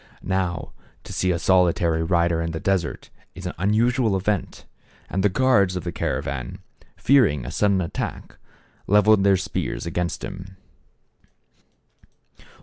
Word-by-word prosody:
How, 95 -2 -2 0.3
to - - -9
see 95 - 0
a 90 - +1
solitary 85 -2 +2
rider 85 0 +1
in 85 0 -3
the 80 - -3
desert 90 -6 -2 0.2
is 95 +3 -9
an 90 - -3
unusual 110 +2 +2
event, 100 0 -2 0.5
and 95 - 0
the 105 - +4
guards 100 -4 +3
of 90 - -4
the 85 - -3
caravan, 65 -5 -3 0.4
fearing 75 - +3
a - - -5
sudden 100 -2 +2
attack, 85 - -5 0.5
leveled 105 0 +5
their 100 -1 +4
spears 90 - -4
against 85 +1 -3
him. 95 0 -8
95 Hz, 135 wpm, -23 LUFS, 85-100 Hz, 0.5 s, leveled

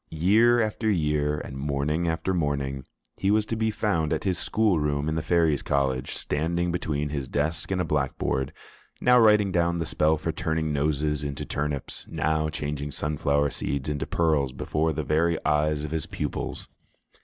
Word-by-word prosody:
Year 110 +9 +4
after 110 0 0
year, 75 -5 +1
and 65 - -7
morning 75 +4 -1
after 80 +3 -1
morning, 70 -5 -1 0.3
he 95 - 0
was 105 +1 +3
to 115 - -3
be 110 0 +1
found 100 -8 0
at - - 0
his 95 -3 0
school 105 -6 +2
room 75 0 0
in 80 - 0
the 80 - -1
Fairies' 80 -2 +2
College, 65 -3 0
standing 85 +3 -1
between 75 -4 -2
his 70 -3 -3
desk 75 +6 -2
and 95 -1 0
a - - +2
blackboard, 65 -2 -1 0.5
now 125 0 +5
writing 105 -3 +5
down 85 -1 +1
the 85 - -2
spell 80 +1 +2
for 80 +2 -2
turning 80 -2 -1
noses 75 0 0
into 70 +1 -4
turnips, 70 -2 -4
now 80 0 0
changing 75 -1 -4
sunflower 70 0 0
seeds 70 0 -3
into 75 -1 -2
pearls 75 -6 +1
before 80 +4 -1
the 75 0 -2
very 80 +3 +2
eyes 75 0 +1
of 75 - -5
his 80 -2 -2
pupils. - - -4
75 Hz, 175 wpm, -26 LUFS, 75-85 Hz, 0.5 s, now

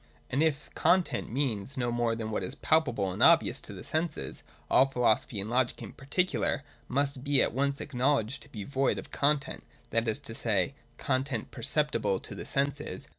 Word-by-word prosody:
And 135 - +1
if 155 -2 0
content 175 -5 +2
means 130 -1 -2
no 120 -1 0
more 120 -1 +1
than 110 -1 -4
what 100 - -1
is 90 - -5
palpable 130 -12 +2
and - - -5
obvious - - +5
to - - -10
the - - -8
senses, 160 +2 -3 0.3
all 135 - +5
philosophy 125 -3 +1
and 100 - -4
logic 120 +1 +1
in - - -8
particular 145 0 0 0.2
must 140 0 -1
be 145 -1 +3
at - - +3
once 140 +2 0
acknow 140 +1 +1
ledged 115 +1 -3
to 140 - -14
be 105 -6 -6
void 135 +3 +1
of - - -7
content, 145 0 0 0.3
that 115 0 +1
is 110 - +1
to 115 - -7
say, 110 -1 0 0.2
of 120 - -34
content 130 -3 -1
per 120 - -9
ceptible 115 -8 +1
to - - -8
the - - -7
senses. 140 -7 -1
130 Hz, 195 wpm, -30 LUFS, 115-140 Hz, 0.3 s, obvious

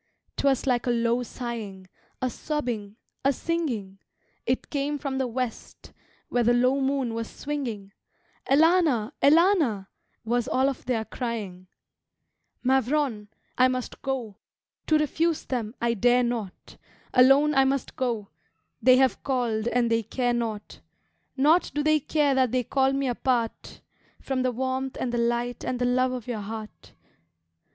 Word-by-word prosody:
"'Twas 275 -2 +1
like 250 -2 +1
a - - +2
low 235 0 +1
sighing, 225 -6 -6 0.4
A 255 - +2
sobbing, 240 -10 -4 0.3
a 275 - +4
singing; 250 - -3 0.5
It 255 +2 -1
came 290 0 -1
from 275 -2 -3
the 260 - 0
west, 245 0 -5 0.3
Where 245 - 0
the 240 +1 +3
low 255 +3 +2
moon 265 -3 0
was 230 0 -4
swinging: 240 -9 -5 0.6
'Elana, 300 -6 +4
Elana' 295 - +4 0.4
Was 240 +1 0
all 260 +1 +2
of 270 - -7
their 235 -3 -1
crying. 210 -8 -5 1.0
Mavrone! 260 -3 +1 0.3
I 255 - +7
must 255 -1 -4
go 250 -7 -3 0.5
To 310 - +4
refuse 320 +2 0
them, 235 -3 -3
I 235 0 +1
dare 245 +3 +3
not. 230 -6 -5 0.4
Alone 270 +4 +6
I 270 -1 +5
must 270 -1 -1
go; 230 -6 -2 0.5
They 255 0 +6
have 260 -1 +2
called 240 -5 -1
and 240 -1 +1
they 230 0 +3
care 245 +3 -1
not 225 -3 -4 0.6
Naught 305 +6 +4
do 295 - 0
they 310 0 +4
care 290 0 +1
that 260 -3 +2
they 255 -1 +1
call 265 +3 +2
me 275 0 -1
apart 240 -2 -2 0.4
From 265 -1 -2
the 255 0 +1
warmth 260 +2 -3
and 250 - -1
the 240 - -1
light 240 +1 -1
and 255 - -2
the 245 - 0
love 255 +1 +2
of 250 -3 -5
your 235 -4 -4
heart. 215 +1 -8
250 Hz, 150 wpm, -26 LUFS, 230-270 Hz, 1.0 s, I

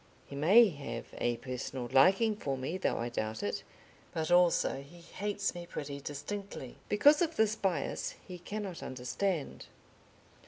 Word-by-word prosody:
He 140 - -9
may 200 +11 +7
have 140 -7 -6
a 120 -1 +1
personal 125 0 -5
liking 195 - +5
for 140 -9 -3
me, 145 +8 -3
though - - 0
I 120 +1 -2
doubt 110 -2 -3
it, 100 - -2 0.5
but 160 +1 -2
also 175 -6 +4
he 170 +5 -14
hates 200 +3 -2
me 175 -1 -8
pretty 140 -3 -5
distinctly, 145 -1 -6
because 290 +9 +6
of 330 -1 +1
this 220 -4 +3
bias 185 -9 -1
he 180 -1 -8
cannot 195 0 -5
understand. 140 +6 -3
170 Hz, 150 wpm, -32 LUFS, 135-200 Hz, 0.5 s, may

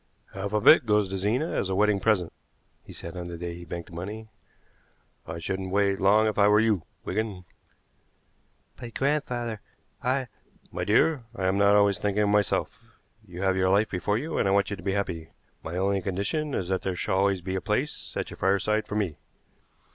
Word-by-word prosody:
"Half 100 +2 -4
of 105 -1 0
it 120 - +8
goes 105 -2 +3
to 95 - -3
Zena 120 - 0
as 95 - -1
a 95 - 0
wedding 105 0 +3
present," 95 -4 +1 0.5
he - - -13
said 85 +2 -8
on 90 -1 -5
the 85 -1 -6
day 85 0 -5
he 85 0 -9
banked 85 0 -7
the - - -10
money. 105 +5 -6 1.0
"I 80 0 -5
shouldn't 95 +3 -3
wait 100 0 +1
long 105 +3 +5
if 110 -1 0
I 100 - +6
were 105 0 +5
you, 110 -5 +2 0.2
Wigan." 105 -5 -3 1.3
"But, 120 -2 -9
grandfather, 125 -6 -1 0.4
I 130 +1 0 0.2
" - - -31
"My - - -3
dear, 150 -7 +3
I'm 95 -1 0
not 100 0 +5
always 100 -2 +4
thinking 105 0 +1
only 100 - +2
of - - +2
myself. 105 -1 +1 0.5
You 90 +1 -6
have 95 -1 +2
your 95 0 +2
life 105 +3 +3
before 105 +3 0
you 155 +7 -3
and - - +2
I - - +2
want 100 0 +2
you - - -1
to - - -12
be 95 - -1
happy. 85 -5 -3 0.3
My 80 +2 -5
only 100 +1 +1
condition 100 - -2
is 90 - -2
that 95 -1 0
there 95 -2 -2
shall 95 +2 0
always 100 -1 +2
be 95 +2 -4
a 95 - -1
place - - -2
at - - -3
your - - -9
fireside 100 +3 +1
for - - -5
me." 100 -8 -1
100 Hz, 210 wpm, -27 LUFS, 95-105 Hz, 1.3 s, it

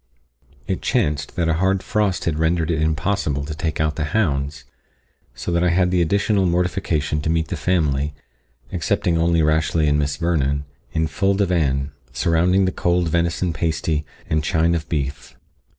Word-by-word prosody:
It - - -2
chanced 75 -1 0
that 85 -2 0
a 80 - +2
hard 95 0 +2
frost 105 -4 0
had 80 -2 -1
rendered 80 0 +1
it 80 -1 0
impossible 80 -2 0
to 75 - -5
take 80 -1 -3
out 75 -1 0
the 75 - 0
hounds, 75 -6 -1 0.7
so 65 +8 -4
that 85 0 +2
I 90 - +3
had 90 +1 +2
the 90 -1 +2
additional 100 +2 +2
mortification 85 -4 0
to 80 - -2
meet 80 -2 0
the - - -2
family, 75 -5 0 0.6
excepting 85 -2 0
only 85 -1 +3
Rashleigh 80 +1 +2
and 75 0 +3
Miss 70 0 -1
Vernon, 70 -4 0 0.3
in 80 - 0
full 95 +5 +1
divan, 75 -8 +1 0.2
surrounding 85 +8 +2
the 95 - +1
cold 85 -1 +1
venison 85 +1 0
pasty 80 0 -1 0.2
and 75 0 0
chine 80 0 +2
of 85 -1 -3
beef. 75 0 -3
80 Hz, 165 wpm, -21 LUFS, 75-90 Hz, 0.7 s, I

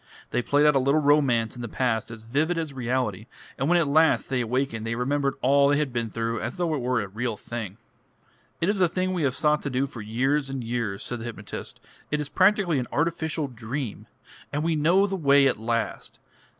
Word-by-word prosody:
They - - +1
played 145 +4 +2
out 150 -1 +5
a - - +5
little 140 +4 +3
romance 140 -6 +2
in 120 - -7
the 120 - -4
past 115 -1 -1
as 115 -1 -9
vivid 155 +9 0
as 160 -3 -3
reality, 125 -3 -2 0.3
and 135 +4 -1
when 175 - +5
at 170 - +3
last 155 +3 +3
they 130 -2 0
awakened 120 -1 -1
they 115 +1 -2
remembered 140 +3 0
all 140 +2 +5
they 145 - +3
had 145 -4 -1
been 115 -2 -1
through 115 +1 -2
as 120 +2 -4
though 175 -3 0
it 145 - -1
were 125 0 +1
a 100 - -4
real 110 +3 -3
thing. 105 -4 -6 0.8
"It 170 - +2
is 205 -1 +1
a 180 - +4
thing 185 +2 -1
we 180 - -1
have 135 -3 +1
sought 150 -1 +2
to 140 - -3
do 130 +1 0
for 125 -4 -8
years 135 +7 0
and 135 -2 -4
years," 115 -4 -3
said 120 - -4
the 115 - -7
hypnotist. 110 -3 -7 0.3
"It 150 - 0
is 150 -1 -3
practically 185 -5 +3
an 125 - -3
artificial 160 0 -1
dream. 120 -1 -5 0.4
And 145 +1 -1
we 165 0 +1
know 170 +6 +4
the 195 -1 -2
way 140 -5 +4
at 130 - +1
last. 115 +1 -3
135 Hz, 225 wpm, -26 LUFS, 120-150 Hz, 0.8 s, out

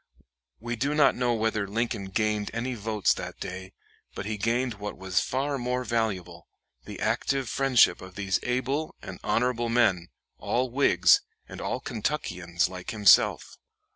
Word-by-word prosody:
We 120 +2 -4
do 140 +6 -1
not 150 -2 +5
know 120 -1 0
whether 110 -2 -1
Lincoln 115 0 -2
gained 105 +1 -1
any 125 +2 -2
votes 110 -2 +1
that - - -7
day, 95 +1 -7 0.4
but 100 - -5
he 110 +1 -2
gained 115 +1 -1
what 105 0 -6
was 95 -1 0
far 140 +2 -1
more 125 +1 -1
valuable, 95 -8 -2 0.4
the - - -8
active 135 -2 0
friendship 130 +1 +3
of 95 0 -11
these 100 -2 0
able 130 +5 -2
and - - -8
honorable 120 -1 0
men, 100 -8 +2 0.3
all 125 0 -1
Whigs 140 +3 +4 0.3
and - - -9
all - - -2
Kentuckians 90 - -2
like 90 -1 -8
himself. 105 -2 +4
115 Hz, 150 wpm, -27 LUFS, 100-125 Hz, 0.4 s, not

